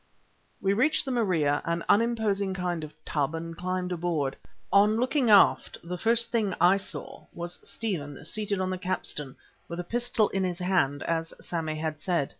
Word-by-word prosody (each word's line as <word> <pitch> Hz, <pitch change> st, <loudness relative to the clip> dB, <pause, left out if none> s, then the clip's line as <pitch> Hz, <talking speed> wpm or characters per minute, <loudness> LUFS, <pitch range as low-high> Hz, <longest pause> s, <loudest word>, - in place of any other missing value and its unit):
We 195 Hz, 0 st, +3 dB
reached 285 Hz, +10 st, +2 dB
the 265 Hz, -, -2 dB
Maria, 170 Hz, -, +1 dB
an 170 Hz, 0 st, -2 dB
unimposing 205 Hz, -4 st, +2 dB
kind 175 Hz, -3 st, -2 dB
of 155 Hz, -, -7 dB
tub, 150 Hz, +1 st, -1 dB
and 165 Hz, 0 st, -5 dB
climbed 180 Hz, +1 st, -2 dB
aboard. 165 Hz, -6 st, -1 dB, 0.4 s
On 205 Hz, +2 st, +5 dB
looking 255 Hz, +1 st, +2 dB
aft 205 Hz, -2 st, +5 dB
the 175 Hz, +2 st, -4 dB
first 230 Hz, +4 st, +2 dB
thing 220 Hz, -4 st, +1 dB
that 185 Hz, -, -4 dB
I 180 Hz, +3 st, +6 dB
saw 195 Hz, -, -5 dB
was 175 Hz, +1 st, -4 dB
Stephen 155 Hz, -11 st, -4 dB
seated 210 Hz, -2 st, -1 dB
on 185 Hz, 0 st, -1 dB
the 185 Hz, -, -3 dB
capstan 165 Hz, -7 st, -3 dB, 0.3 s
with 170 Hz, +1 st, -6 dB
a -, -, -2 dB
pistol 235 Hz, +1 st, +1 dB
in 195 Hz, 0 st, -1 dB
his 180 Hz, -2 st, -1 dB
hand, 180 Hz, -6 st, +1 dB
as 165 Hz, 0 st, -2 dB
Sammy 160 Hz, -2 st, -3 dB
had 155 Hz, -1 st, -4 dB
said. 170 Hz, -7 st, 0 dB
180 Hz, 180 wpm, -28 LUFS, 165-205 Hz, 0.4 s, I